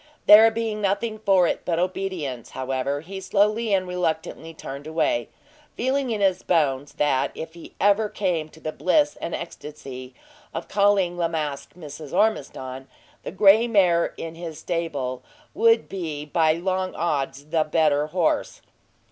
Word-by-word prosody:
There 220 +2 +9
being 225 -1 -3
nothing 210 +2 -1
for 195 -4 +4
it - - -1
but 170 -2 -1
obedience, 180 -8 -3
however, 130 +2 -2
he 190 +4 -8
slowly 210 +3 +1
and 190 -2 +2
reluctantly 165 -2 -3
turned 145 -2 -8
away, 155 -7 0 0.5
feeling 265 +1 0
in 215 -3 -2
his 190 -2 +2
bones, 145 -5 0
that 140 -2 +1
if 160 +1 -7 0.2
ever 205 +2 +3
he - - -18
came 170 -6 0
to 160 - -17
the 155 - -4
bliss 290 - +2
and 170 - -3
ecstasy 135 -6 -8 0.4
of - - -4
calling 200 -3 +2
La 170 - +2
Masque 150 -4 -4
Mrs. 150 -3 -9
Ormiston, 135 -10 -1 0.3
the - - -6
gray 205 +5 +5
mare 180 -7 +3
in 165 -1 -6
his 165 -2 -7
stable 145 -8 -3 0.3
would 455 +4 +3
be 160 -6 -5
by 160 0 +2
long 185 +2 -2
odds 140 -4 -2
the 155 +1 +1
better 150 -1 +2
horse. 170 +1 -1
170 Hz, 150 wpm, -24 LUFS, 150-195 Hz, 0.5 s, There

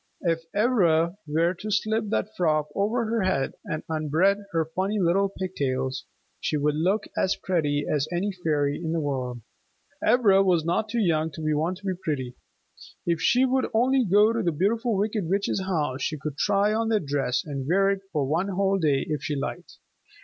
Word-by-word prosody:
If 165 -1 -1
Ivra 180 -7 +3
were 165 +4 +1
to 200 +4 -7
slip 215 +1 0
that 215 0 -2
frock 155 -5 +1
over 225 +4 0
her 225 0 0
head, 185 -8 0
and 160 -6 -4
unbraid 160 +6 +1
her 165 -1 +1
funny 190 +6 -2
little 195 +2 +2
pigtails, 135 -9 -3 0.3
she 155 - -1
would 150 +1 +1
look 185 +8 +1
as 190 - +1
pretty 150 -5 -1
as 150 0 0
any 185 +4 -1
fairy 150 -6 0
in 160 0 -2
the 165 - 0
world. 130 -5 -3 0.6
Ivra 205 -6 +5
was 175 -5 +2
not 175 +6 0
too 235 - -2
young 160 -7 +1
to 155 0 -1
want 165 +5 -1
to 200 - -15
be 190 - 0
pretty. 145 -8 -4 0.7
If 170 -1 0
she 250 +6 +4
would 260 0 +1
only 255 +3 +3
go 210 +2 +4
to 230 - 0
the 170 - +1
Beautiful 210 - 0
Wicked 205 -3 -1
Witch's 195 0 0
house, 150 -8 -1
she 155 +3 -2
could 150 -1 -5
try 200 +6 +2
on 225 +1 0
that 215 -7 +1
dress, 135 -3 0
and 140 -3 -5
wear 195 +4 +3
it 195 -1 -2
for 145 -3 0
one 165 +8 0
whole 195 0 +1
day 145 -5 +1
if 150 -3 -2
she 150 - -2
liked. 135 - -5
175 Hz, 190 wpm, -25 LUFS, 150-200 Hz, 0.7 s, Ivra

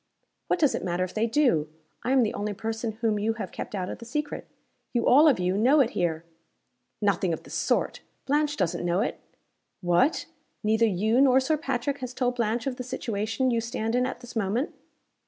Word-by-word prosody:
"What - - +2
does 300 -6 +3
it - - -3
matter 180 0 0
if 185 - -5
they 220 +1 +1
do? 230 - +2 0.3
I 250 - -1
am 265 -2 +5
the 215 - -1
only 205 0 -3
person 225 +2 -3
whom 220 -1 0
you 220 +2 +1
have 225 - -6
kept - - -6
out 185 -2 -2
of - - -6
the - - -9
secret. 295 +5 -4 0.5
You 240 - +1
all 295 +5 +7
of 285 - +5
you 180 +1 +1
know 255 +9 +4
it 250 -4 +3
here." 170 -5 -1 0.8
"Nothing 190 -3 +2
of - - -5
the - - -14
sort! - - 0 0.3
Blanche 295 +1 +1
doesn't 180 -4 -1
know 175 +2 +1
it." 235 - -2 0.6
"What! 180 - +2 0.4
Neither 220 +2 +3
you 220 +5 +2
nor 265 -1 +6
Sir 265 +4 +1
Patrick 275 -2 -2
has 255 -1 -6
told 250 -1 0
Blanche 230 0 0
of 265 -2 -2
the 250 - -4
situation 230 +1 -1
you 230 -1 +1
stand 225 -1 -3
in 250 +1 +2
at 255 - -6
this 245 -1 -11
moment?" 225 - -1
230 Hz, 210 wpm, -27 LUFS, 205-260 Hz, 0.8 s, all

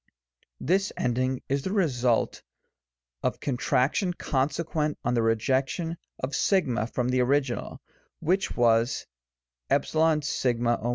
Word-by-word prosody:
This 190 +7 +1
ending 130 +1 0
is 140 +1 0
the 190 - -3
result 130 - +1 0.8
of - - -1
contraction 140 +6 +1
consequent 150 +2 -1
on 120 - +1
the 120 - +2
rejection 130 +9 0 0.2
of 130 +2 -4 0.2
o 130 - +2
from 125 0 -1
the 125 0 +2
original, 130 -2 0 0.4
which 185 +5 0
was 115 0 +2 0.6
a6(o. 130 -7 +1
130 Hz, 105 wpm, -27 LUFS, 120-155 Hz, 0.8 s, the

